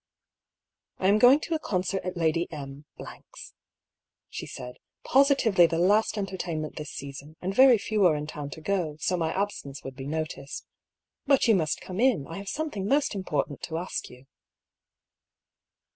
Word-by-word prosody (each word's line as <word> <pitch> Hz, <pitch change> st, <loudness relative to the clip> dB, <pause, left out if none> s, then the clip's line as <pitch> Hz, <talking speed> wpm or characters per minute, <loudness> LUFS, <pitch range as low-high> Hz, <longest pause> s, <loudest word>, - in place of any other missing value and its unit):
"I 190 Hz, -, +2 dB
am 210 Hz, +1 st, +4 dB
going 255 Hz, +6 st, +7 dB
to 330 Hz, -, -3 dB
a 320 Hz, -, 0 dB
concert 190 Hz, -, -1 dB
at 180 Hz, 0 st, -4 dB
Lady 165 Hz, +1 st, +1 dB
M 140 Hz, -1 st, -8 dB
^'s," -, -, -11 dB, 0.8 s
she -, -, -6 dB
said; 125 Hz, -1 st, -8 dB, 0.3 s
^'positively 255 Hz, -, +4 dB
the 165 Hz, -, -1 dB
last 205 Hz, +6 st, +3 dB
entertainment 180 Hz, -6 st, -4 dB
this 150 Hz, -1 st, -5 dB
season, 140 Hz, +2 st, -8 dB
and 190 Hz, +2 st, -3 dB
yery 255 Hz, -1 st, +7 dB
few 215 Hz, -1 st, 0 dB
are 160 Hz, -, +3 dB
in 150 Hz, 0 st, -3 dB
town 150 Hz, -2 st, -6 dB
to -, -, -10 dB
go, 170 Hz, -4 st, -1 dB
so 180 Hz, -, 0 dB
my 165 Hz, -2 st, -1 dB
absence 190 Hz, -8 st, -4 dB
would 135 Hz, -1 st, -7 dB
be 135 Hz, 0 st, -7 dB
noticed. 155 Hz, -2 st, -4 dB, 0.6 s
But 275 Hz, -3 st, +4 dB
you 225 Hz, -, +6 dB
must 160 Hz, -6 st, 0 dB
come 185 Hz, +1 st, -6 dB
in; 235 Hz, -, +3 dB
I 165 Hz, +5 st, -7 dB
haye 200 Hz, -, -8 dB
something 210 Hz, -5 st, -3 dB
most 280 Hz, +1 st, +2 dB
important 150 Hz, -8 st, -2 dB
to 160 Hz, -, -4 dB
ask 175 Hz, +2 st, -4 dB
you." 125 Hz, +2 st, -15 dB
180 Hz, 170 wpm, -27 LUFS, 150-205 Hz, 0.8 s, going